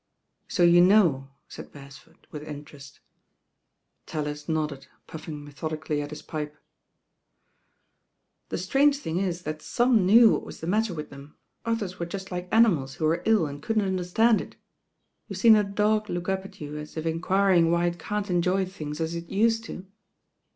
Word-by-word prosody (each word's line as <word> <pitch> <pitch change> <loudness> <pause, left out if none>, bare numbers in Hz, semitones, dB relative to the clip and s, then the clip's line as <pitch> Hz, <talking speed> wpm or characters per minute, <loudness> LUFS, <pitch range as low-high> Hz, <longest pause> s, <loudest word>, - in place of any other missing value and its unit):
So 175 - +1
you 175 0 +7
know," 175 -9 +4 0.2
said - - -10
Beresford 140 -1 -15
with 150 - -7
interest. 145 -2 -11 1.1
raUis 150 0 -5
nodded, 150 -4 -2 0.2
puffing 155 -2 -8
methodically 155 +1 -4
at 145 - -6
his 150 - -9
pipe. 150 -1 -6 1.9
i*»c»trange 275 +11 +2
thing 180 - -3
is 180 -2 -2
that 155 -1 -5
some 240 -4 +2
knew 220 +5 +7
what - - 0
was - - -10
the - - -6
matter 210 +1 0
with 150 -1 -7
them, 140 +1 -13 0.3
others 205 -5 -2
were 170 - -3
just 190 +2 -7
like 180 0 -5
animals 170 - +3
who 155 - -2
were 165 +2 +1
lU 220 -7 +4
and 145 0 -7
couldn't 220 +4 0
understand 190 +5 +2
it. - - -11 0.7
YouVe - - -5
seen 230 -2 +7
a 210 - +3
dog 210 +1 0
look 175 0 -4
up 190 0 -1
at 195 +1 -13
you 150 0 -6
as 150 +1 -9
if 160 - -4
enquiring 175 +1 +2
why 170 +1 +2
it 175 0 -2
can 210 0 -2
t 195 -2 -4
enjoy 180 +2 +1
things 155 -5 -7
as 165 0 -2
it 170 0 -6
used 225 +2 +1
to 185 - -8
175 Hz, 170 wpm, -26 LUFS, 150-200 Hz, 1.9 s, you